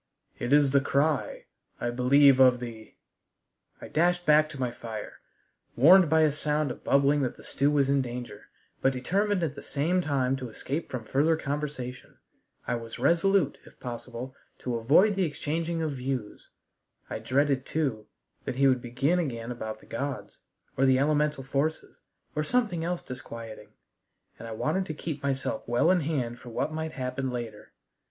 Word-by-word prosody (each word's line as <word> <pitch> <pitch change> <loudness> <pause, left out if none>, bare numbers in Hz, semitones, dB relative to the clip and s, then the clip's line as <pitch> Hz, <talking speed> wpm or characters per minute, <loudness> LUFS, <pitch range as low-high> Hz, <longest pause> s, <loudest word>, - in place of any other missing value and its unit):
It 120 - -3
is 145 -1 +5
the 140 0 +4
cry, 145 +2 0 0.3
I 120 - -1
believe 135 +2 +5
of 125 -2 +6
the 115 -3 -9 0.4
" - - -40
I - - -6
dashed 175 +2 +1
back 155 0 +5
to 140 - -9
my 125 -2 -1
fire, 115 -3 -8 0.6
warned 170 +6 +7
by 160 +1 +4
a 155 -1 +4
sound 150 -1 0
of - - -9
bubbling 140 +1 +3
that 130 - -2
the - - -14
stew 140 +1 +1
was 145 -2 +2
in 140 0 +3
danger, 125 -1 -7 0.3
but 135 - +3
determined 190 +9 0
at 155 -4 -1
the 140 - -9
same 165 +6 0
time 135 -5 0
to 130 -2 -6
escape 140 +8 -4
from 125 -3 -5
further 150 +7 +2
conversation. 140 -4 -5 0.5
I - - -1
was 115 0 -8
resolute, 170 +4 +2
if - - -18
possible, 125 +1 -7 0.2
to 120 -2 -3
avoid 155 - +4
the 195 - +1
exchanging 165 +2 -2
of 155 - -1
views. 130 -4 -5 0.6
I - - -5
dreaded, 135 +3 +1
too, 130 -9 -2 0.4
that - - -3
he 135 +1 +4
would 130 -2 +3
begin 135 +8 0
again 120 -7 -3
about 110 -2 -6
the - - -17
gods, 140 +3 -5 0.4
or 135 +1 +3
the 130 0 +5
elemental 150 0 +1
forces, 140 +4 -2 0.3
or 150 - 0
something 210 -4 0
else 175 +1 -2
disquieting, 115 -3 -8 0.7
and 115 - -8
I - - -7
wanted 170 +11 -1
to 155 - -4
keep 150 -2 -5
myself 135 -1 -2
well 120 +9 +3
in 185 - +3
hand 130 -6 -2
for 125 - -11
what 135 +6 -2
might 160 0 -4
happen 130 +1 -3
later. 120 -4 -6
140 Hz, 175 wpm, -28 LUFS, 125-155 Hz, 0.7 s, warned